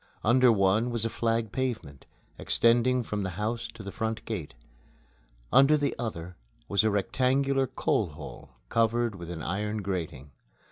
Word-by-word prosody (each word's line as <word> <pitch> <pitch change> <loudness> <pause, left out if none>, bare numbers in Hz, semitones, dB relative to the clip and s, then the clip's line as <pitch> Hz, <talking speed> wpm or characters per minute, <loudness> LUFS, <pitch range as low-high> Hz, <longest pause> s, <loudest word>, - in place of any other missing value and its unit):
Under 125 +2 +5
one 105 +3 +2
was 115 -2 -1
a 115 - -1
flag 115 -1 0
pavement, 115 - -4 0.3
extending 120 +2 +3
from 105 -2 -3
the 95 - -2
house 115 +2 -2
to 110 - -9
the 100 - -6
front 110 +1 -3
gate. 100 -10 -5 1.0
Under 135 +4 +6
the 145 -1 0
other 90 -7 -5 0.3
was 100 0 +3
a 110 - +3
rectangular 130 +6 +1
coal - - 0
hole - - -10 0.2
covered 115 0 +1
with 85 -3 -9
an 80 -2 -6
iron 105 +3 -2
grating. 80 -8 -4
110 Hz, 150 wpm, -28 LUFS, 100-120 Hz, 1.0 s, Under